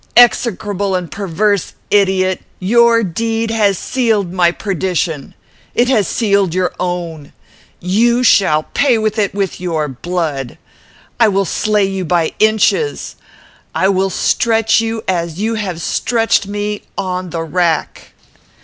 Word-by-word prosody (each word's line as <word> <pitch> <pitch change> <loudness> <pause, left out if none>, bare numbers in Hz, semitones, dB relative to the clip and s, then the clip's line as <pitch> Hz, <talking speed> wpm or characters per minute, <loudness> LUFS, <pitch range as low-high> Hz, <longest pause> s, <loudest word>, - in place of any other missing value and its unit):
Execrable 205 -5 +3
and 175 -4 -4
perverse 200 +2 -1 0.2
idiot! 190 -2 +2 0.2
Your 230 +4 +4
deed 225 +4 -2
has 205 -4 +2
sealed 220 -8 0
my 180 -2 +3
perdition. 180 -6 -3 0.4
It 245 +1 +2
has 215 -8 +2
sealed 200 -6 +1
your 185 -1 0
own. 170 -4 -4 0.5
You 235 +7 +2
shall 190 -10 +4
pay 265 -5 +3
for 215 0 0
it 200 -1 -1
with 195 -3 -2
your 160 -4 -1
blood. 145 -2 -4 0.6
I 230 - +6
will 195 -1 +1
slay 210 +3 +1
you 195 -1 -3
by 170 -1 0
inches. 220 - +1 0.6
I 190 - +2
will 195 0 +1
stretch 225 +3 +2
you, 225 0 -3
as 170 -2 -2
you 220 +2 0
have 195 -6 -3
stretched 225 - +1
me, 205 0 -3 0.2
on 185 -1 -3
the 165 0 -3
rack." 165 -1 -1
195 Hz, 130 wpm, -16 LUFS, 175-220 Hz, 0.6 s, I